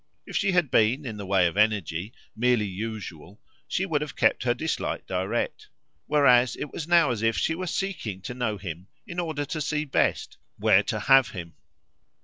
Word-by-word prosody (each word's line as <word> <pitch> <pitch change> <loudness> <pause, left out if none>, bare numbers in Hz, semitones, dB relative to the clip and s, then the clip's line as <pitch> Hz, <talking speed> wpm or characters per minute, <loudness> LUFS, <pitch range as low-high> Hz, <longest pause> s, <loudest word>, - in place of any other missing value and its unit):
If - - -9
she 200 -2 +2
had 175 -7 +2
been, 125 +5 +3
in 110 -4 -5
the 100 -2 -7
way 95 -2 +3
of 85 - 0
energy, 100 -3 +1 0.2
merely 120 -1 +2
usual 100 -3 -7 0.3
she 190 - -1
would 155 -6 0
have 150 -2 -5
kept - - +2
her 120 0 +1
dislike 160 +6 -3
direct; 445 -3 -2 0.4
whereas 125 -5 +4
it 150 - -6
was 155 - -5
now 170 -6 +4
as 115 -3 -3
if 115 0 +1
she 160 - +1
were 185 +3 -4
seeking 170 - -3
to 125 - -6
know 120 -4 -2
him 90 -1 -7 0.2
in 175 0 -5
order 155 -4 -2
to 155 +2 -4
see 150 +1 -1
best 140 - 0 0.2
where - - +5
to - - -3
"have" 135 -2 +5
him. 85 -4 -8
125 Hz, 190 wpm, -26 LUFS, 105-155 Hz, 0.4 s, where